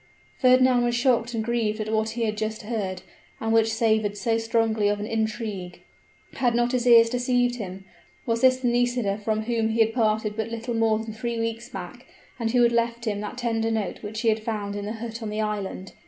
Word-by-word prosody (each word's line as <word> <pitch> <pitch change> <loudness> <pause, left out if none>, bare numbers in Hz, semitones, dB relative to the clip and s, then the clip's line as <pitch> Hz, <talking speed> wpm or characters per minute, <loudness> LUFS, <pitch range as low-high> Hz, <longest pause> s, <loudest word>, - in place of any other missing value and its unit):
Fernand 255 -1 +5
was 240 0 +1
shocked 240 -1 +1
and 220 - -1
grieved 225 -2 -1
at 215 0 -3
what 220 0 +1
he 235 - 0
had 215 -1 0
just 215 +1 -3
heard, 205 -4 -3 0.4
and 225 0 -1
which 225 0 +4
savored 220 -2 +1
so 230 +1 0
strongly 225 -2 +1
of 205 0 0
an 205 - -3
intrigue. 220 -5 -3 0.5
Had 245 -3 +1
not 240 0 +2
his 250 -1 0
ears 230 -1 +8
deceived 245 0 +1
him? 190 -3 -7 0.4
was 230 -1 0
this 255 0 +5
the 255 -1 -2
Nisida 240 -4 +1
from 215 +1 -1
whom 225 -1 0
he 225 +1 -1
had 225 0 +4
parted 215 -2 +1
but 220 0 -3
little 230 +1 -4
more 225 -1 +2
than 220 0 -6
three 235 +2 -3
weeks 230 +1 -3
back, 195 +3 -8 0.3
and 230 -1 0
who 245 +1 +3
had 235 - +4
left 235 0 0
him 205 -2 -1
that 210 +4 -6
tender 225 -2 0
note 220 -3 -2
which 215 +1 -5
he 230 - +3
had 220 0 +1
found 210 -3 -3
in 205 0 -4
the 215 - -3
hut 230 0 -6
on 220 - -4
the 210 +1 -3
island? 200 -3 -4
225 Hz, 220 wpm, -25 LUFS, 215-240 Hz, 0.5 s, ears